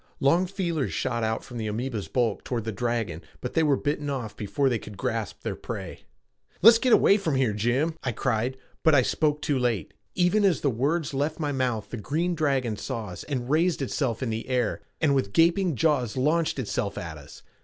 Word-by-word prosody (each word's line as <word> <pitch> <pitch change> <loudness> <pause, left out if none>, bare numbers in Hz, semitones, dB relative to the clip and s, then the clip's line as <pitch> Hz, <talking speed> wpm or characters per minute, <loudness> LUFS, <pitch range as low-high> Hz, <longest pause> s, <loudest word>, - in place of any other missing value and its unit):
Long 170 +7 +3
feelers 175 -7 -2
shot 120 -1 -1
out 110 0 -1
from 125 - -9
the 110 -1 -3
amoeba's 110 0 -3
bulk 120 -5 0
toward 120 -3 -2
the 110 - -3
dragon 115 -5 -2 0.2
but 125 - -5
they 160 - +3
were 145 -4 +3
bitten 145 0 -2
off 120 -6 -4
before 105 +7 0
they 120 -4 +1
could 105 -1 -10
grasp 115 -5 -3
their - - -2
prey. - - -7 0.6
"Let's 225 +2 +9
get 255 0 +2
away 200 - +6
from 165 -8 -1
here, 130 -5 +2
Jim," 125 +10 0
I 130 - 0
cried, 125 +2 -1 0.2
but 160 -2 +5
I 130 - +5
spoke 150 +3 0
too 140 -3 +1
late. 115 -10 -1 0.2
Even 180 +4 +3
as 190 -5 +3
the 140 - +2
words 145 +6 0
left 145 +4 -1
my 150 -2 -1
mouth 125 -5 -1
the 120 - -4
green 160 - -1
dragon 135 -8 0
saw 115 -5 -4
us 90 - -8
and 130 -5 -3
raised 160 +4 +2
itself 130 -2 -1
in 120 - -1
the 110 +3 -4
air, 120 -5 0 0.2
and 150 -3 +3
with 130 -8 0
gaping 170 0 +3
jaws 130 -4 +1
launched 155 +5 +1
itself 105 -5 -2
at 80 -3 -6
us. 70 - -14
130 Hz, 210 wpm, -26 LUFS, 115-155 Hz, 0.6 s, Let's